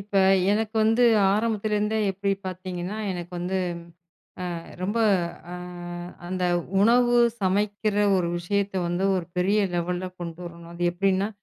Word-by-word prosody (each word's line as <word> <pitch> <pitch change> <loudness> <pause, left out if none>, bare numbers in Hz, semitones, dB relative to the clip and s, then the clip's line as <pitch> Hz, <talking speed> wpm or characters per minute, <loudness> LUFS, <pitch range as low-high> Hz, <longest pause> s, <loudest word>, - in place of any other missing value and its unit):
இப்ப 200 0 -1 0.3
எனக்கு 220 +2 0
வந்து 225 +3 +3 0.3
ஆரம்பத்துலருந்தே 215 0 0
எப்படி 195 +1 -2 0.2
பாத்தீங்கன்னா 185 +2 -5
எனக்கு 175 -1 -6
வந்த 180 +2 -3 1.0
அ - - -4 0.2
ரொம்ப 205 +5 -1 0.5
அ - - -4 0.7
அந்த 185 0 -2 0.4
உணவு 240 +3 +4 0.3
சமைக்கற 205 +2 0 0.2
ஒரு 175 -2 0
விஷயத்தை 200 +2 -1
வந்து 175 +2 -1
ஒரு 185 -2 -1
பெரிய 195 +4 +2
லெவல்ல 175 +1 -1
கொண்டு 170 -1 -6
வரணும். 170 -1 -10
அது 170 +1 -6
எப்டின்னா, 195 +2 +1
195 Hz, 125 wpm, -25 LUFS, 180-210 Hz, 1.0 s, உணவு